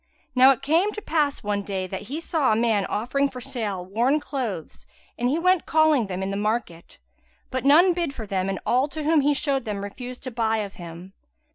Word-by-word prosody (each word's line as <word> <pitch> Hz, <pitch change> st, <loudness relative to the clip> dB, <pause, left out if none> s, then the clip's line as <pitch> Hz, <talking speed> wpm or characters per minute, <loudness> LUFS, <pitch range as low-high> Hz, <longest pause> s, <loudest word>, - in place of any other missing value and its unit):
Now 255 Hz, +1 st, +7 dB
it 265 Hz, -4 st, +2 dB
came 335 Hz, +8 st, +2 dB
to -, -, -5 dB
pass 295 Hz, -5 st, 0 dB
one 205 Hz, -1 st, -1 dB
day 195 Hz, -2 st, -3 dB
that 190 Hz, +2 st, -6 dB
he 295 Hz, +4 st, -3 dB
saw 320 Hz, -6 st, +1 dB
a -, -, +3 dB
man 220 Hz, -3 st, +1 dB
offering 275 Hz, +6 st, 0 dB
for 255 Hz, -, -8 dB
sale 220 Hz, -8 st, -4 dB
worn 240 Hz, +10 st, +1 dB
clothes, 260 Hz, -, -5 dB, 0.3 s
and 245 Hz, +1 st, 0 dB
he 290 Hz, -, +1 dB
went 365 Hz, 0 st, +2 dB
calling 310 Hz, -7 st, +3 dB
them 190 Hz, 0 st, -4 dB
in 195 Hz, -, -2 dB
the -, -, -2 dB
market, 210 Hz, -5 st, -3 dB, 0.5 s
but 260 Hz, +1 st, -3 dB
none 340 Hz, +6 st, +6 dB
bid 340 Hz, -4 st, -1 dB
for 235 Hz, -5 st, -7 dB
them 195 Hz, -1 st, -1 dB
and 195 Hz, -, -2 dB
all 255 Hz, +3 st, +2 dB
to 310 Hz, +1 st, -6 dB
whom 310 Hz, 0 st, +3 dB
he 290 Hz, +1 st, +2 dB
showed 275 Hz, -2 st, 0 dB
them 205 Hz, -3 st, -4 dB
refused 245 Hz, +5 st, -8 dB
to 255 Hz, -, -5 dB
buy 225 Hz, -1 st, 0 dB
of 205 Hz, -2 st, -4 dB
him. 175 Hz, +3 st, -10 dB
245 Hz, 220 wpm, -24 LUFS, 200-290 Hz, 0.5 s, Now